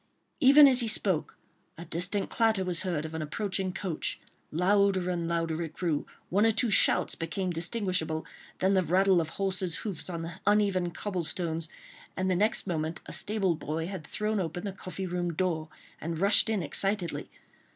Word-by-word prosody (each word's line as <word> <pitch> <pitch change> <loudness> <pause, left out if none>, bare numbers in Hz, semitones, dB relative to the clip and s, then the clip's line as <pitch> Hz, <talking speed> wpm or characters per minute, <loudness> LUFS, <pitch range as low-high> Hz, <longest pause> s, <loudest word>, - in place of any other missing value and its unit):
Even 280 +2 +8
as 255 -2 +5
he 235 - +2
spoke, 190 -6 0 0.4
a 170 - -8
distant 180 +5 -1
clatter 220 -5 +2
was 180 -1 +1
heard 170 -6 -2
of 160 - -7
an 160 - -3
approaching 185 +5 -2
coach; 185 -4 -3 0.3
louder 190 +1 +2
and 170 -2 -2
louder 165 -1 -1
it 165 -2 -5
grew, 165 -5 -1 0.2
one 200 +4 +3
or 225 - +5
two 230 +1 +1
shouts - - +3
became 180 +3 -3
distinguishable, 175 -3 -1 0.3
then 190 +1 +2
the 190 - +4
rattle 185 +1 +3
of 160 - -4
horses' 185 -1 -1
hoofs 190 -4 -3
on 170 -2 -4
the 165 0 -7
uneven 200 -4 +3
cobble 185 +1 -3
stones, 165 -1 -2 0.5
and 185 0 0
the - - +2
next 210 +5 +1
moment 160 -2 -2
a - - -8
stable 200 -4 +2
boy 160 +1 -3
had 185 -2 -6
thrown 215 0 -1
open 175 0 -3
the 200 - -3
coffee 185 0 -6
room 175 -1 -2
door 160 -2 -1 0.3
and 165 +1 -3
rushed 200 +5 +5
in 210 -5 0
excitedly. 190 +4 -1
185 Hz, 180 wpm, -29 LUFS, 165-200 Hz, 0.5 s, Even